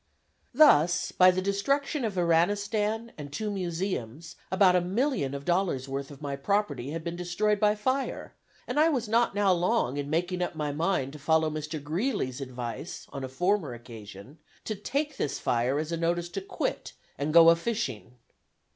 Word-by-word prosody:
Thus 180 - +5
by 185 0 +6
the 185 0 0
destruction 275 +9 0
of 215 -4 -2
Iranistan, 205 +6 +1
and 145 -1 -7
two 210 +8 -3
Museums, 170 - -4
about 185 -1 +4
a 180 - +4
million 190 - -1
of 140 0 -7
dollars' 175 -7 0
worth 135 0 -4
of 145 0 -12
my 140 -1 -3
property 145 -5 -1
had 160 +2 -5
been 170 0 -4
destroyed 190 +4 0
by 210 0 +3
fire, 260 +6 -2 0.3
and - - -1
I 315 +2 +5
was 250 -7 -1
not 230 -1 +2
now 200 -2 +4
long 175 - +1
in 145 0 -3
making 180 +3 -1
up 175 - -2
my 150 -2 -2
mind 145 -3 -1
to 150 - -9
follow 160 +1 +2
Mr. 155 +1 -4
Greeley's 155 - -2
advice 125 +3 -6
on 135 - -5
a 130 - -4
former 175 -1 0
occasion, 115 - -12 0.3
to 215 - -2
"take 280 +8 -3
this 140 - -2
fire 125 +3 0
as 155 +2 -3
a 165 - -1
notice 170 +1 -1
to 195 +3 -4
quit, 190 - -4 0.3
and 145 +2 -1
go 165 +1 +8
a - - +5
fishing." 135 - -4
175 Hz, 180 wpm, -28 LUFS, 145-205 Hz, 0.3 s, go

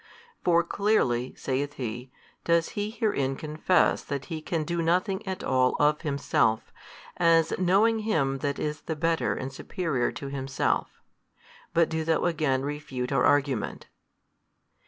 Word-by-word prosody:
For 170 -1 +4
clearly 160 - +1
(saith 140 +2 -2
he) 125 -1 -5 0.3
does 170 -1 +2
He 205 0 -3
herein 205 - 0
confess 155 +5 +1
that 140 -2 -4
He 160 - -4
can 160 0 -2
do 170 +2 -2
nothing 185 +4 +1
at 190 -1 -4
all 130 -1 +2
of 150 +1 +3
Himself, 140 -7 0 0.4
as 165 -2 +4
knowing 200 +5 +3
Him 145 -11 0
that 140 0 -2
is 150 0 -3
the 160 - -4
Better 165 +1 0
and 135 +1 -5
superior 155 -5 -2
to 140 - -6
Himself. 135 -1 -1 0.9
But 165 -1 +5
do 160 -1 -2
thou 160 0 +1
again 150 -6 +1
refute 140 -3 -4
our 135 -3 +2
argument." 140 -6 +1
150 Hz, 140 wpm, -27 LUFS, 135-170 Hz, 0.9 s, But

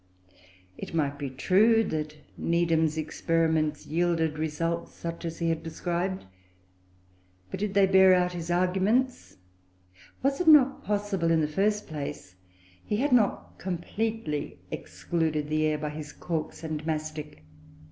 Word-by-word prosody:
It - - -6
might 145 -3 0
be 140 -2 -3
true 210 - +4
that 155 -5 -3 0.2
Needham's 165 -2 +1
experiments 160 -1 0
yielded 165 -1 0
results 165 +2 -2
such 170 0 -6
as 165 0 -4
he 170 -1 0
had 165 -1 -1
described, 175 - -3 1.3
but - - -4
did 200 -1 -2
they 200 -1 +6
bear 190 0 +6
out 180 0 +1
his 170 -1 -5
arguments? 190 +8 +1 0.9
Was 275 +4 +1
it 355 - -2
not 275 -4 +6
possible, 200 -4 0
in 165 -1 +3
the 150 - +1
first 205 +6 0
place, 140 - -6 0.5
he 210 - -2
had 280 +5 0
not 235 -5 +1
completely 190 - -3
excluded 150 - -2
the 155 0 +2
air 155 -1 0
by 150 0 -3
his 150 0 -8
corks 165 -1 -4
and 155 -1 -4
mastic? 155 - -4
165 Hz, 135 wpm, -28 LUFS, 155-190 Hz, 1.3 s, they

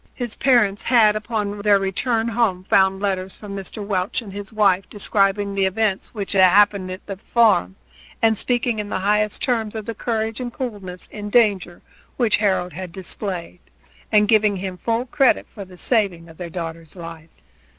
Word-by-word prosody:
His 240 -3 -3
parents 235 -7 +3
had 225 -4 +4
upon 210 -2 -3
their 205 -1 +5
return 225 +4 -1
home 220 -6 0
found 190 0 +3
letters 190 -2 -2
from 205 -2 -8
Mr. 200 +2 -6
Welch 195 +3 -1
and 200 -3 -10
his 200 -1 -7
wife 200 -3 +2
describing 200 -1 +1
the 195 -1 +2
events 200 0 -1
which 205 -4 -6
had 195 - +3
happened 195 0 +4
at 185 +1 -8
the 195 -2 -6
farm, 210 - +2 0.6
speaking 240 0 -1
in 205 -1 -4
the 190 - -2
highest 210 +1 +1
terms 225 -4 -1
of 215 -1 -5
the 230 - -4
courage 225 +1 -2
and 245 -1 -4
coolness 200 -8 -6
in 210 -1 -6
danger 200 -6 +2 0.3
which 235 -4 +3
Harold 190 -4 0
had 180 +1 -7
displayed, 180 -1 -5 0.5
and 210 -1 +4
giving 210 -1 +3
him 185 0 -5
full 230 +1 -1
credit 270 +1 +2
for 200 -3 -8
the 185 -1 -15
saving 185 -7 0
of 160 - -15
their 175 -2 -6
daughter's 165 -1 -7
life. 165 -2 -9
205 Hz, 175 wpm, -21 LUFS, 185-220 Hz, 0.6 s, their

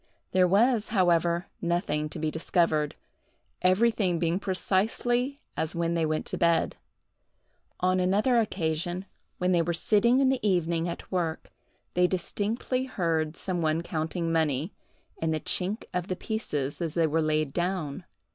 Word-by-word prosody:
There 185 -1 +4
was, 220 +4 +3
however, 175 -3 +2 0.2
nothing 170 -3 0
to - - -7
be 155 0 -1
discovered, 160 -2 +1 0.7
everything 185 -1 +3
being 170 +2 0
precisely 225 +7 0 0.2
as 160 +2 -2
when 170 0 0
they 165 -2 +1
went 155 0 -1
to - - -4
bed. 170 -1 +2 1.1
On 185 +1 +2
another 205 +7 +3
occasion, 175 -3 -1 0.3
when 180 0 +1
they 175 -2 +4
were 170 +1 -1
sitting 230 +8 +4
in 270 -1 +4
the 265 -1 +1
evening 175 -4 +1
at 170 - -7
work, 170 -3 -2 0.4
they 180 0 +4
distinctly 215 +8 -1
heard 165 -8 -1
some 180 -2 -2
one 160 +1 +1
counting 165 +1 -2
money, 160 0 0 0.5
and 160 0 +1
the 155 - 0
chink 195 +7 -2
of 180 0 -2
the 185 - -2
pieces 165 - -3
as 165 -3 -2
they 165 -1 +3
were 160 +1 +1
laid 155 -2 0
down. 175 -2 -2
175 Hz, 150 wpm, -28 LUFS, 160-195 Hz, 1.1 s, There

